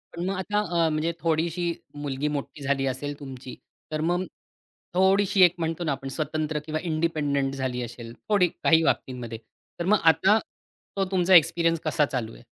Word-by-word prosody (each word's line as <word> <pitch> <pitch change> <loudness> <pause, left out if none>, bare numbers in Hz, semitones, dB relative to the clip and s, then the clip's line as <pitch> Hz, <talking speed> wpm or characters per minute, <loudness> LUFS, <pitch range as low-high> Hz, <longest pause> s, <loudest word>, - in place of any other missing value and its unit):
पण 170 +1 -3
मग 195 +1 -1
आता 190 +3 -1 0.3
अ, - - +2
म्हणजे 155 +2 0
थोडीशी 170 +1 0 0.3
मुलगी 140 +1 -2
मोठी 150 0 -4
झाली 135 0 0
असेल 145 +2 -4
तुमची, 130 -2 -9 0.4
तर 155 0 -2
मग, 175 +3 0 0.7
थोडीशी 195 +2 +3
एक 175 -1 +6
म्हणतो 165 +1 -2
ना, 155 - 0
आपण 135 0 -4
स्वतंत्र 155 +1 -2
किंवा 155 0 -2
इंडिपेंडंट 155 -5 0
झाली 130 -2 -2
असेल, 115 -1 -8 0.2
थोडी 200 -4 +4
काही 165 -1 +2
बाबतींमध्ये, 125 -6 -2 0.4
तर 170 - -2
मग 210 +3 +4
आता 190 +6 +5 0.6
तो 195 - +2
तुमचा 185 0 +4
एक्सपिरियन्स 165 0 +4
कसा 150 -3 +2
चालू 120 -5 -4
आहे? - - -15
155 Hz, 165 wpm, -26 LUFS, 140-175 Hz, 0.7 s, एक